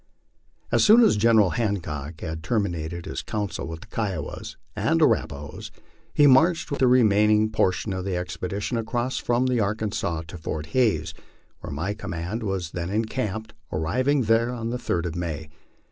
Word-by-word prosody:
As -, -, +4 dB
soon 225 Hz, +3 st, +7 dB
as 220 Hz, -, +5 dB
General 105 Hz, -3 st, +4 dB
Hancock 85 Hz, -9 st, -3 dB
had 80 Hz, -2 st, -4 dB
terminated 85 Hz, -3 st, -2 dB
his -, -, -4 dB
council 105 Hz, -6 st, -3 dB
with 80 Hz, 0 st, -7 dB
the -, -, -11 dB
Kiowas 95 Hz, -9 st, -4 dB, 0.2 s
and -, -, +1 dB
Arrapahoes, 70 Hz, 0 st, 0 dB, 0.4 s
he 145 Hz, -, +4 dB
marched 160 Hz, +6 st, +4 dB
with 140 Hz, -, -2 dB
the 130 Hz, -, +4 dB
remaining 110 Hz, -3 st, +4 dB
portion 100 Hz, -1 st, +1 dB
of 95 Hz, 0 st, -3 dB
the 95 Hz, -1 st, -2 dB
expedition 100 Hz, +5 st, -3 dB
across 120 Hz, +3 st, -2 dB
from 120 Hz, +1 st, +1 dB
the 125 Hz, -2 st, +1 dB
Arkansas 105 Hz, -5 st, -1 dB
to 90 Hz, -, -8 dB
Fort 80 Hz, -1 st, -4 dB
Hays, 90 Hz, -12 st, +2 dB, 0.5 s
where -, -, -7 dB
my 80 Hz, +8 st, -2 dB
command 90 Hz, +2 st, -4 dB
was 95 Hz, -5 st, -3 dB
then 85 Hz, 0 st, -4 dB
encamped, 110 Hz, 0 st, -2 dB, 0.2 s
ar -, -, -2 dB
riving 130 Hz, -, +1 dB
there 115 Hz, +2 st, +3 dB
on 115 Hz, -2 st, -3 dB
the 125 Hz, -, -3 dB
third 85 Hz, -6 st, -1 dB
of 85 Hz, -1 st, -3 dB
May. 80 Hz, -3 st, -4 dB
105 Hz, 165 wpm, -25 LUFS, 85-115 Hz, 0.5 s, soon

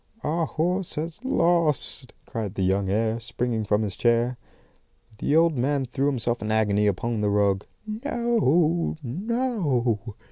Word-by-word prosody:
"'Our 160 Hz, +2 st, 0 dB
horse 180 Hz, +3 st, 0 dB
has 165 Hz, +8 st, -5 dB
lost!' 170 Hz, -, +2 dB
cried 105 Hz, -3 st, -5 dB
the 95 Hz, -, -1 dB
young 95 Hz, +1 st, +1 dB
heir, 110 Hz, +3 st, 0 dB
springing 120 Hz, -1 st, -2 dB
from 105 Hz, +1 st, +1 dB
his 100 Hz, -4 st, -4 dB
chair. 120 Hz, +3 st, +2 dB, 0.8 s
"The 145 Hz, -, +1 dB
old 165 Hz, -1 st, +4 dB
man 135 Hz, +2 st, 0 dB
threw 135 Hz, +3 st, -1 dB
himself 120 Hz, -3 st, -1 dB
in 110 Hz, -, -2 dB
agony 105 Hz, -1 st, +2 dB
upon 110 Hz, +3 st, -1 dB
the 105 Hz, -, +1 dB
rug. 100 Hz, -1 st, +1 dB, 0.2 s
'No, 215 Hz, -, +1 dB
no! 140 Hz, -, -1 dB
125 Hz, 140 wpm, -25 LUFS, 110-170 Hz, 0.8 s, old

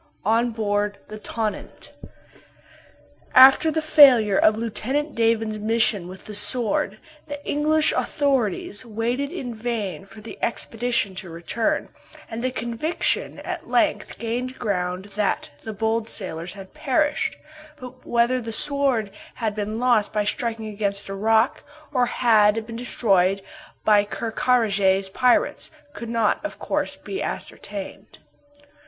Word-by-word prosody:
ON 230 Hz, +3 st, +3 dB
BOARD 205 Hz, -2 st, -1 dB
THE 215 Hz, 0 st, -8 dB
"TONNANT." 215 Hz, 0 st, -5 dB, 1.4 s
After 265 Hz, +5 st, +8 dB
the 315 Hz, 0 st, -1 dB
failure 250 Hz, -10 st, +6 dB
of 215 Hz, 0 st, +4 dB
Lieutenant 265 Hz, +6 st, -2 dB
Davon's 225 Hz, -2 st, +1 dB
mission 215 Hz, -4 st, +1 dB
with 185 Hz, +1 st, -11 dB
the 215 Hz, -, -8 dB
Sword, 210 Hz, -1 st, +2 dB, 0.3 s
the 290 Hz, -1 st, -5 dB
English 310 Hz, +1 st, +2 dB
authorities 250 Hz, -, -1 dB
waited 240 Hz, +5 st, -2 dB
in 260 Hz, -9 st, -5 dB
vain 215 Hz, -4 st, -4 dB
for 215 Hz, -, -13 dB
the 220 Hz, +1 st, -10 dB
expedition 235 Hz, -3 st, -1 dB
to 185 Hz, -, -6 dB
return, 170 Hz, +7 st, -2 dB, 0.4 s
and 225 Hz, +2 st, -4 dB
the 255 Hz, -, +1 dB
conviction 245 Hz, +6 st, -2 dB
at -, -, -6 dB
length -, -, +1 dB
gained 245 Hz, +3 st, -3 dB
ground 185 Hz, -4 st, -2 dB
that 205 Hz, -7 st, -1 dB
the 220 Hz, -, -6 dB
bold 220 Hz, +1 st, -1 dB
sailors 175 Hz, -3 st, -4 dB
had 195 Hz, -1 st, -12 dB
perished; 295 Hz, +1 st, 0 dB, 0.4 s
but 250 Hz, -3 st, -11 dB
whether 240 Hz, +2 st, +1 dB
the 225 Hz, -1 st, -6 dB
Sword 270 Hz, -5 st, +1 dB, 0.2 s
had 220 Hz, -3 st, -2 dB
been 210 Hz, +1 st, -3 dB
lost 240 Hz, -4 st, +2 dB
by 210 Hz, -1 st, 0 dB
striking 225 Hz, 0 st, -2 dB
against 200 Hz, -2 st, -2 dB
a -, -, -4 dB
rock 220 Hz, +4 st, +2 dB, 0.3 s
or 250 Hz, -2 st, +2 dB
had 220 Hz, -3 st, +3 dB
been 230 Hz, 0 st, -8 dB
destroyed 195 Hz, -5 st, +1 dB, 0.4 s
by 210 Hz, -1 st, +5 dB
Ker 225 Hz, +2 st, -4 dB
Karraje's 200 Hz, -6 st, +2 dB
pirates, 250 Hz, +4 st, +2 dB, 0.2 s
could 235 Hz, -, -7 dB
not, 230 Hz, +2 st, +1 dB
of 310 Hz, -, -5 dB
course, -, -, -2 dB
be 390 Hz, -, -6 dB
ascertained. -, -, -7 dB
225 Hz, 135 wpm, -23 LUFS, 205-250 Hz, 1.4 s, After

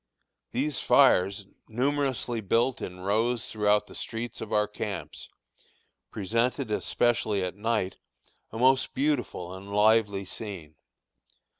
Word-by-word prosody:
These 135 Hz, +2 st, -1 dB
fires, 95 Hz, +2 st, +4 dB, 0.2 s
numerously 130 Hz, -1 st, -1 dB
built 115 Hz, +5 st, +1 dB
in 90 Hz, 0 st, -6 dB
rows 115 Hz, +5 st, 0 dB
throughout 105 Hz, -1 st, +2 dB
the -, -, -14 dB
streets 115 Hz, +1 st, -5 dB
of 110 Hz, -, -6 dB
our 105 Hz, 0 st, +2 dB
camps, 105 Hz, -1 st, -6 dB, 0.8 s
presented, 115 Hz, +4 st, -1 dB
especially 110 Hz, -3 st, +1 dB
at 90 Hz, -, -3 dB
night, 105 Hz, -2 st, -1 dB, 0.5 s
a 110 Hz, -, -8 dB
most 130 Hz, +2 st, +3 dB
beautiful 130 Hz, -10 st, -1 dB
and 95 Hz, +2 st, -9 dB
lively 105 Hz, -1 st, +3 dB
scene. 95 Hz, -6 st, -8 dB
110 Hz, 115 wpm, -28 LUFS, 100-120 Hz, 0.8 s, fires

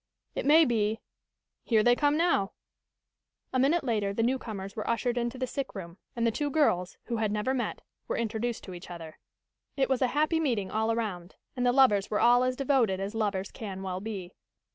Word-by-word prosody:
It -, -, -3 dB
may 315 Hz, +2 st, +7 dB
be 220 Hz, -3 st, +1 dB, 0.6 s
Here 220 Hz, -3 st, +3 dB
they 245 Hz, +1 st, +5 dB
come, 290 Hz, +3 st, +2 dB
now!" 330 Hz, -, +2 dB, 1.0 s
A 255 Hz, -, +2 dB
minute 290 Hz, +6 st, +3 dB
later 210 Hz, -6 st, 0 dB
the 225 Hz, -, +1 dB
newcomers 220 Hz, -6 st, -2 dB
were 215 Hz, -, -4 dB
ushered 240 Hz, +1 st, 0 dB
into 240 Hz, +1 st, -2 dB
the 255 Hz, -, -1 dB
sick 265 Hz, 0 st, -5 dB
room, 175 Hz, -1 st, -8 dB, 0.2 s
and 235 Hz, -1 st, 0 dB
the 230 Hz, -, +3 dB
two 290 Hz, +6 st, -1 dB
girls, 220 Hz, -, +1 dB
who 235 Hz, -, -3 dB
had 215 Hz, -2 st, 0 dB
never 210 Hz, +5 st, 0 dB
met, 250 Hz, -2 st, -3 dB, 0.2 s
were -, -, -1 dB
introduced 230 Hz, +1 st, -2 dB
to 185 Hz, -, -8 dB
each 175 Hz, +1 st, -10 dB
other. 165 Hz, -3 st, -9 dB, 0.6 s
It 270 Hz, -, +2 dB
was 265 Hz, -1 st, +1 dB
a 255 Hz, -, +4 dB
happy 310 Hz, +2 st, +3 dB
meeting 235 Hz, -11 st, 0 dB
all 220 Hz, +1 st, +1 dB
around, 200 Hz, -6 st, -3 dB, 0.2 s
and 250 Hz, -1 st, +1 dB
the -, -, +5 dB
lovers 245 Hz, -7 st, +4 dB
were 210 Hz, -, 0 dB
all 245 Hz, +1 st, +5 dB
as 255 Hz, 0 st, 0 dB
devoted 250 Hz, -8 st, +2 dB
as 195 Hz, +2 st, -3 dB
lovers 205 Hz, -3 st, -1 dB
can 195 Hz, -3 st, -6 dB
well 185 Hz, -1 st, -3 dB
be. 195 Hz, -4 st, -6 dB
230 Hz, 205 wpm, -29 LUFS, 200-255 Hz, 1.0 s, may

